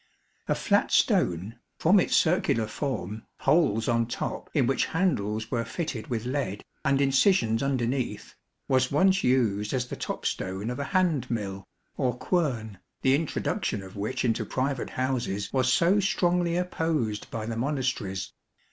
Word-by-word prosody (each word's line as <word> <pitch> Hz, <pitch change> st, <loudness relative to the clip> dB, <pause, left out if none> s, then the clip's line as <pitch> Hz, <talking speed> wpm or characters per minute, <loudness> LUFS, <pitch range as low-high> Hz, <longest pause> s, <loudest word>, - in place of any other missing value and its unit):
A -, -, +2 dB
flat -, -, +1 dB
stone 95 Hz, +7 st, +2 dB, 0.2 s
(from 190 Hz, +5 st, +5 dB
its -, -, +1 dB
circular 155 Hz, -9 st, +2 dB
form, 110 Hz, -3 st, -4 dB
holes 135 Hz, -7 st, +3 dB
on 115 Hz, -1 st, +2 dB
top 120 Hz, -, -4 dB
in 140 Hz, -6 st, +2 dB
which 135 Hz, +2 st, +1 dB
handles 110 Hz, -, 0 dB
were 115 Hz, -2 st, 0 dB
fitted 120 Hz, -1 st, -4 dB
with 115 Hz, -2 st, -3 dB
lead, 125 Hz, -7 st, -2 dB, 0.2 s
and 140 Hz, 0 st, +2 dB
incisions 135 Hz, -, +3 dB
under 135 Hz, -3 st, 0 dB
neath), 130 Hz, +1 st, -3 dB, 0.3 s
was 130 Hz, -1 st, +2 dB
once 190 Hz, +6 st, +3 dB
used 110 Hz, -4 st, +2 dB
as 125 Hz, -1 st, 0 dB
the -, -, -6 dB
top -, -, -5 dB
stone 95 Hz, +5 st, -2 dB
of 125 Hz, -, -5 dB
a 140 Hz, -, -2 dB
hand 170 Hz, -, +1 dB
mill, 100 Hz, -4 st, -3 dB, 0.3 s
or 125 Hz, -3 st, 0 dB
quern, 120 Hz, -, -1 dB, 0.2 s
the 130 Hz, -, +4 dB
introduction 140 Hz, -8 st, -1 dB
of 95 Hz, +1 st, -11 dB
which 105 Hz, +6 st, -2 dB
into 115 Hz, -2 st, +1 dB
private 135 Hz, 0 st, -2 dB
houses 125 Hz, -6 st, -2 dB
was 130 Hz, -1 st, +2 dB
so 175 Hz, +9 st, +4 dB
strongly 175 Hz, -3 st, +1 dB
opposed 160 Hz, -11 st, -1 dB
by 110 Hz, -1 st, -4 dB
the 115 Hz, 0 st, -3 dB
Monasteries. 120 Hz, -7 st, -2 dB
125 Hz, 155 wpm, -27 LUFS, 110-145 Hz, 0.3 s, from